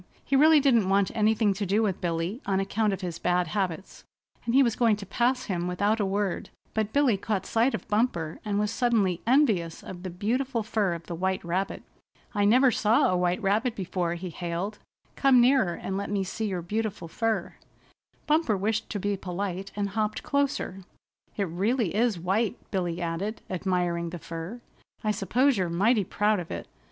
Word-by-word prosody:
He 275 - +1
really 310 +3 +7
didn't 235 -9 +3
want 195 0 +3
anything 215 -1 +2
to 200 +2 -4
do 200 +3 +2
with 195 -3 -1
Billy 175 - -2
on 195 -1 +2
account 205 +2 0
of 195 - -3
his 175 -2 -4
bad 180 -1 +1
habits, 190 -2 -3 0.4
and 235 - 0
he 275 - +7
was 235 -4 +1
going 230 -3 +3
to 205 -1 -8
pass 245 +6 +1
him 175 -2 -2
without 205 +5 +1
a 205 - +1
word; 195 -1 -1 0.2
but 215 -1 -1
Billy 275 -6 +3
caught 195 -1 -2
sight 235 +4 +2
of - - -8
Bumper, 210 -8 0
and 205 -2 -1
was 210 0 0
suddenly 220 -8 +1
envious 220 - +2
of 180 -2 -8
the 185 - -5
beautiful 230 +6 -1
fur 210 -4 0
of 170 - -9
the 175 - -6
white 190 +1 -1
rabbit. 185 +3 -2 0.5
"I 205 -2 +2
never 250 +5 +5
saw 225 -2 +3
a - - +2
white 180 +3 0
rabbit 220 +5 +1
before," 180 -2 -2
he 175 +1 -6
hailed. 175 +5 -4 0.4
"Come 270 -3 +5
nearer 240 -8 +4
and 190 - -4
let 200 - -3
me 200 -1 0
see 215 +4 -3
your 185 -4 -3
beautiful 210 -1 -3
fur." 220 +1 -1 0.7
Bumper 300 -9 +2
wished 215 +3 -1
to 205 - -3
be 205 +1 0
polite 190 +1 -4
and 205 -1 -1
hopped 215 +1 -2
closer. 280 -9 -1 0.6
"It 205 - +1
really 195 +4 0
is 225 -1 +2
white," 200 +7 0
Billy 175 -3 -2
added, 175 +6 -3
admiring 175 -2 -1
the 175 - -6
fur. 165 +8 -7 0.4
"I 215 - +2
suppose 240 +5 +2
you're 180 -2 0
mighty 205 +6 +3
proud 210 +2 +1
of 170 - -7
it." - - -5
200 Hz, 190 wpm, -27 LUFS, 180-225 Hz, 0.7 s, really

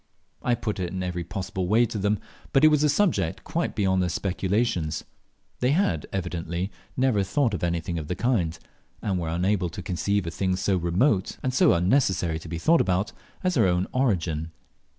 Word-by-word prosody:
I 125 - +2
put 110 -4 -3
it 90 -2 -2
in 95 +1 -4
every 90 -1 -3
possible 95 0 -4
way 115 +5 +4
to 110 -2 -4
them, 105 +2 +1 0.4
but 135 - +4
it - - +9
was 150 -1 +3
a 150 - +4
subject 145 - +1
quite - - -2
beyond 95 -2 +2
their 90 - 0
speculations; 95 -2 -1 0.6
they 125 +3 +2
had 145 - +1
evidently 90 0 -3 0.3
never 130 -6 +3
thought 110 +5 +1
of 95 - -3
anything 85 0 -1
of 75 - -6
the 90 - -2
kind, 90 -10 0 0.5
and 95 -3 0
were 85 -2 -3
unable 90 +2 +1
to 80 - -8
conceive 100 +2 0
a 85 - -3
thing 95 +2 0
so 95 +1 +1
remote 95 - +1
and 130 - 0
so - - +5
unnecessary 90 - +2
to 80 - -10
be 85 - -3
thought 165 - +4
about, 95 +2 0 0.3
as 185 0 +2
their 115 - +4
own 90 +1 +1
origin. 85 - 0
95 Hz, 190 wpm, -26 LUFS, 85-115 Hz, 0.6 s, it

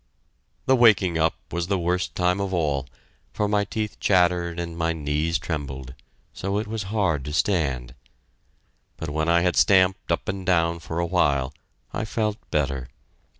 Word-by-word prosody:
The 130 - +5
waking 100 -8 +4
up 80 0 +2 0.2
was 85 0 -2
the 100 0 +1
worst 90 +1 -1
time 90 +1 +1
of 95 -1 -1
all, 70 -5 0 0.5
for 105 - 0
my 105 0 +2
teeth 105 +1 -4
chattered 90 -2 +2
and 85 -1 -4
my 85 0 0
knees 75 +2 0
trembled, 70 -7 -5 0.4
so 100 +1 -2
it 105 - -1
was 105 -1 -4
hard 95 -10 +1
to 75 - -4
stand. 75 -8 0 1.0
But 80 -2 -5
when 80 +2 0
I 85 0 +4
had 90 0 +1
stamped 95 -1 +4
up 85 - -1
and 95 -1 -3
down 85 -2 +2
for 80 0 -6
a 85 - +1
while, 70 -6 +1 0.4
I - - -2
felt 105 -1 -1
better. 70 -4 -1
85 Hz, 165 wpm, -24 LUFS, 80-95 Hz, 1.0 s, The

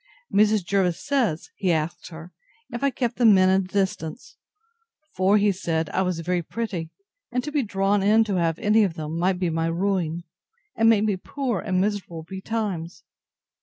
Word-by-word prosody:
Mrs. 210 -2 +3
Jervis 185 -3 +1
says, 245 - -1
he 185 -3 +1
asked 165 +2 -2
her, 165 0 -11 0.4
If 240 +3 -5
I 280 - +4
kept 245 -3 -2
the 245 - 0
men 190 -3 +6
at 190 0 +4
a - - -1
distance? 190 -1 -3 0.8
for, 190 +3 +4
he 205 0 +3
said, 165 -4 -2
I 190 - 0
was 180 -3 -1
very 175 +1 -1
pretty; 180 -3 -4 0.4
and 250 +1 -1
to 300 - -5
be 295 -1 +1
drawn 200 -2 +1
in 215 +3 +4
to 205 -4 -2
have 165 -2 +1
any 210 +1 +3
of 185 -5 -1
them, 155 +1 -4
might 180 +1 +1
be 180 -2 -1
my 165 0 0
ruin, 170 -1 -1 0.5
and 225 0 +4
make 215 -2 +4
me 210 -3 0
poor 245 +1 -3
and 185 -2 -1
miserable 190 -5 -2
betimes. 190 -2 -4
190 Hz, 185 wpm, -24 LUFS, 170-215 Hz, 0.8 s, men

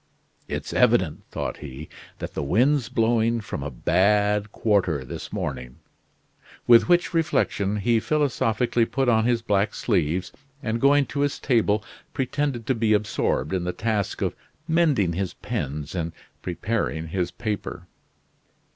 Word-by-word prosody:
"It's - - -4
evident," 115 -10 +3
thought - - -4
he, 75 +1 -8 0.3
"that - - -6
the - - -3
wind's 125 - +2
blowing 115 0 +2
from 105 - -5
a 70 - -3
bad 105 +8 +2
quarter 95 - +1
this - - -7
morning," 60 -2 -4 0.9
with 120 +6 +6
which 175 0 +3
reflection 105 - +1
he 115 +2 +2
philosophically 120 -4 +1
put 135 +2 -1
on 110 -2 +3
his 120 -1 +1
black 100 0 +1
sleeves 90 -5 0 0.3
and 115 +1 -1
going 140 +1 +5
to 140 - -5
his 145 0 +1
table 110 -4 +2 0.3
pretended 135 -2 -1
to 130 - +2
be 110 -2 +2
absorbed 105 -7 0
in 90 -2 0
the 90 +1 -2
task 105 -4 -1
of - - 0 0.3
mending 155 - +2
his 95 +2 -3
pens 75 +2 -4
and 85 -2 -3 0.3
preparing 90 -3 -2
his 90 0 -1
paper. 110 -1 -4
110 Hz, 140 wpm, -24 LUFS, 90-120 Hz, 0.9 s, with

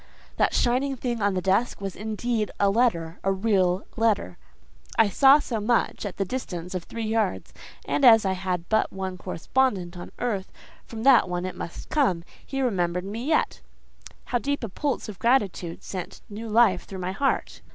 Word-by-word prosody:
That - - +2
shining 260 +3 +1
thing 240 -2 -3
on 200 -1 +1
the 185 - -1
desk 195 +6 +1
was 195 -2 -5
indeed 220 +1 -2
a 200 -1 +4
letter, 180 -8 +1
a 195 - +2
real 190 -2 +1
letter; 215 - 0 0.6
I 225 -2 +5
saw 270 +7 +7
so 240 -6 -3
much 225 -1 0
at 190 - -8
the 195 - 0
distance 180 -6 -5
of 180 -2 -4
three 230 -1 -5
yards, 215 -3 -1 0.3
and 280 - -1
as 225 -4 +8
I 190 - +2
had 180 -2 -3
but 220 0 +1
one 190 -1 -5
correspondent 190 -2 -1
on 175 - -8
earth, 205 -6 -2 0.4
from 225 -1 -7
that 260 -8 +6
one 175 0 -2
it 185 - -5
must 170 - -7
come. 195 - +2 0.2
He 270 -1 -3
remembered 180 -6 0
me 215 +4 -5
yet. 310 - +1 0.6
How 245 - 0
deep 285 +1 -2
a 230 - -3
pulse 280 +7 -2
of 205 -3 -8
gratitude 205 -8 0
sent 185 -3 -6
new 220 +2 -7
life 215 -4 +4
through 195 - -8
my 185 0 -3
heart. 275 +8 -1
205 Hz, 185 wpm, -25 LUFS, 185-240 Hz, 0.6 s, as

